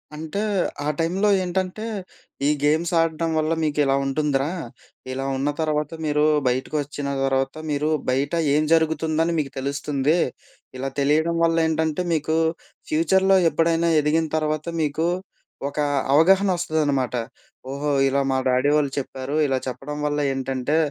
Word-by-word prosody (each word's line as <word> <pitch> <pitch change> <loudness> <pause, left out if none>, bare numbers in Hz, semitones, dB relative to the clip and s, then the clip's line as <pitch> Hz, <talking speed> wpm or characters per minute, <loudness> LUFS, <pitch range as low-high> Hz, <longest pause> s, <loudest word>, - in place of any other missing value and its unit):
అంటే 160 +6 -4 0.4
ఆ - - -1
టైంలో 185 +6 +1
ఏంటంటే, 185 +4 -2 0.6
ఈ - - +4
గేమ్స్ 155 +3 +2
ఆడడం 165 0 0
వల్ల 155 +1 +1
మీకు 150 -1 -1
ఇలా 135 0 +2
ఉంటుందిరా! 140 0 0 0.6
ఇలా 135 +1 -3
ఉన్న 140 +2 0
తర్వాత 150 -1 -1
మీరు 150 0 +1 0.2
బయటకు 130 +4 -1
ఒచ్చిన 145 0 -6 0.2
తర్వాత 135 0 0 0.2
మీరు 150 +1 0 0.2
బయట 135 +4 0 0.2
ఏం 150 +1 +3
జరుగుతుందని 160 0 +1
మీకు 140 -3 -3
తెలుస్తుంది. 140 +3 0 0.6
ఇలా 135 +1 -3
తెలియడం 155 +4 +2
వల్ల 165 0 +3
ఏంటంటే 160 +1 0
మీకు 155 0 0 0.5
ఫ్యూచర్‌‌లో 190 +5 +3
ఎప్పుడైనా 165 +1 +1
ఎదిగిన 155 +2 +1
తర్వాత 155 -1 -1 0.2
మీకు, 155 +2 0 0.6
ఒక 145 - -15 0.4
అవగాహన 190 +6 +5
ఒస్తదనమాట. 145 -7 0 0.6
ఓహో! 145 +2 -2 0.2
ఇలా 140 +1 +1
మా 130 - +1
డాడీ 130 +3 +2
వోళ్ళు 145 -2 0
చెప్పారు 135 +1 -5
ఇలా 135 -1 0
చెప్పడం 135 +3 -5
వల్ల 145 0 -1
ఏంటంటే 135 +2 -1
150 Hz, 135 wpm, -23 LUFS, 140-160 Hz, 0.6 s, అవగాహన